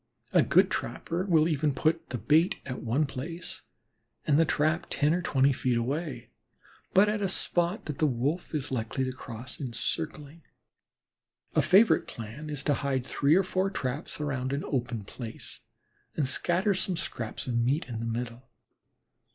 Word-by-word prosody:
A -, -, +6 dB
good -, -, +4 dB
trapper 180 Hz, +4 st, -2 dB
will 160 Hz, -3 st, +4 dB
even 150 Hz, -3 st, +1 dB
put 160 Hz, +4 st, +1 dB
the 125 Hz, -, -2 dB
bait 160 Hz, -, +3 dB
at 130 Hz, -2 st, -5 dB
one 125 Hz, +7 st, +1 dB
place 165 Hz, +6 st, -5 dB, 0.6 s
and 145 Hz, 0 st, +4 dB
the 165 Hz, -, +5 dB
trap 155 Hz, +3 st, +1 dB
ten 145 Hz, +3 st, +2 dB
or 180 Hz, -, 0 dB
twenty 135 Hz, -4 st, +3 dB
feet 125 Hz, -1 st, 0 dB
away, 135 Hz, +1 st, -3 dB, 0.6 s
but 195 Hz, +3 st, +6 dB
at 210 Hz, 0 st, 0 dB
a 195 Hz, -, +1 dB
spot 175 Hz, +1 st, 0 dB
that 150 Hz, -3 st, -5 dB
the 155 Hz, -, +4 dB
Wolf 145 Hz, +7 st, -1 dB
is 145 Hz, -2 st, -2 dB
likely 125 Hz, +1 st, -1 dB
to 130 Hz, -, -1 dB
cross 130 Hz, -1 st, -8 dB
in 130 Hz, -5 st, -4 dB
circling. 155 Hz, +4 st, -2 dB, 1.1 s
A -, -, +4 dB
favorite 195 Hz, +7 st, +5 dB
plan 120 Hz, +7 st, -7 dB
is 145 Hz, -2 st, -2 dB
to 145 Hz, -, +2 dB
hide 135 Hz, -2 st, -1 dB
three 145 Hz, +3 st, +3 dB
or 190 Hz, -, +4 dB
four 185 Hz, +1 st, 0 dB
traps 140 Hz, -5 st, -4 dB
around 135 Hz, -3 st, -2 dB
an 140 Hz, -, -1 dB
open 120 Hz, -5 st, -2 dB
place, 115 Hz, +3 st, -7 dB, 0.6 s
and 145 Hz, -4 st, +1 dB
scatter 180 Hz, +9 st, +2 dB
some 185 Hz, -1 st, -1 dB
scraps 115 Hz, -7 st, -3 dB
of 120 Hz, -2 st, 0 dB
meat 130 Hz, +7 st, +1 dB
in 115 Hz, -3 st, -5 dB
the 115 Hz, -, -3 dB
middle. 120 Hz, +2 st, -4 dB
145 Hz, 170 wpm, -29 LUFS, 125-165 Hz, 1.1 s, A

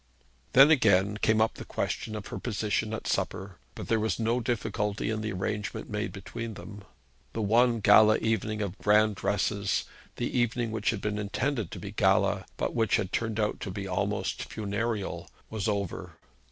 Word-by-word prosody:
Then 135 Hz, +4 st, +8 dB
again 105 Hz, -7 st, +4 dB
came 110 Hz, 0 st, +2 dB
up 110 Hz, +1 st, +3 dB
the -, -, -8 dB
question 110 Hz, -, -3 dB
of 105 Hz, -, -6 dB
her -, -, -5 dB
position 110 Hz, -1 st, -1 dB
at 110 Hz, -, -5 dB
supper, 95 Hz, 0 st, -2 dB, 0.2 s
but -, -, -7 dB
there 115 Hz, -, +2 dB
was 110 Hz, +2 st, -1 dB
no 115 Hz, +2 st, +1 dB
difficulty 110 Hz, -3 st, -1 dB
in 110 Hz, -1 st, -2 dB
the 110 Hz, 0 st, -3 dB
arrangement 100 Hz, +4 st, -3 dB
made 105 Hz, +2 st, -2 dB
between 110 Hz, +3 st, -6 dB
them. 100 Hz, +1 st, -10 dB, 0.5 s
The 115 Hz, -, -2 dB
one 115 Hz, +2 st, +3 dB
gala 110 Hz, +2 st, +7 dB
evening 110 Hz, -1 st, -1 dB
of 100 Hz, 0 st, -5 dB
grand 105 Hz, +1 st, +4 dB
dresses 100 Hz, 0 st, 0 dB, 0.3 s
the 120 Hz, -, -3 dB
evening 120 Hz, -1 st, +1 dB
which 110 Hz, -2 st, 0 dB
had 105 Hz, -4 st, -1 dB
been 105 Hz, 0 st, -2 dB
intended 110 Hz, -, -1 dB
to -, -, -7 dB
be 100 Hz, -, -6 dB
a -, -, -8 dB
gala, 100 Hz, -1 st, +2 dB
but -, -, -1 dB
which 115 Hz, -3 st, +2 dB
had 100 Hz, -3 st, -1 dB
turned 110 Hz, -1 st, -1 dB
out 105 Hz, -1 st, 0 dB
to -, -, -5 dB
be 100 Hz, +1 st, -5 dB
almost 95 Hz, +1 st, -2 dB
funereal 105 Hz, 0 st, -3 dB, 0.2 s
was 110 Hz, -1 st, -2 dB
over. 100 Hz, -4 st, -3 dB
105 Hz, 180 wpm, -28 LUFS, 100-115 Hz, 0.5 s, Then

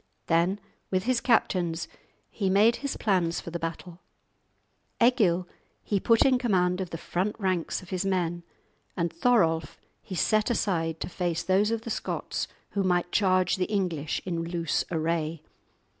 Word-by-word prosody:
Then 175 Hz, +4 st, +2 dB, 0.3 s
with 185 Hz, -1 st, 0 dB
his 250 Hz, 0 st, +1 dB
captains 180 Hz, -8 st, +1 dB, 0.4 s
he 195 Hz, -3 st, -1 dB
made 210 Hz, +5 st, +4 dB
his 280 Hz, -1 st, -4 dB
plans 180 Hz, -5 st, +1 dB
for 170 Hz, -, -8 dB
the 170 Hz, -, -3 dB
battle. 165 Hz, +1 st, -6 dB, 1.0 s
Egil 205 Hz, -8 st, +3 dB, 0.4 s
he 205 Hz, -, 0 dB
put 230 Hz, +3 st, +4 dB
in 260 Hz, -2 st, +4 dB
command 185 Hz, -6 st, +1 dB
of 185 Hz, -, -4 dB
the 165 Hz, -, -5 dB
front 185 Hz, +5 st, -2 dB
ranks 185 Hz, -2 st, -1 dB
of 185 Hz, -, -14 dB
his 185 Hz, 0 st, -1 dB
men, 175 Hz, -3 st, 0 dB, 0.6 s
and 170 Hz, -2 st, -1 dB
Thorolf 165 Hz, -6 st, +2 dB, 0.2 s
he 185 Hz, -, -7 dB
set 215 Hz, +5 st, +2 dB
aside 165 Hz, -8 st, 0 dB
to -, -, -2 dB
face 175 Hz, -2 st, -2 dB
those 195 Hz, +3 st, +3 dB
of 225 Hz, -1 st, -1 dB
the 230 Hz, -, -5 dB
Scots -, -, -3 dB, 0.2 s
who 200 Hz, -, 0 dB
might 175 Hz, -2 st, +1 dB
charge 185 Hz, -2 st, +2 dB
the 185 Hz, -, +1 dB
English 180 Hz, -8 st, -2 dB
in 170 Hz, -3 st, -2 dB
loose 165 Hz, -1 st, -1 dB
array. 160 Hz, -1 st, -1 dB
185 Hz, 160 wpm, -27 LUFS, 170-205 Hz, 1.0 s, made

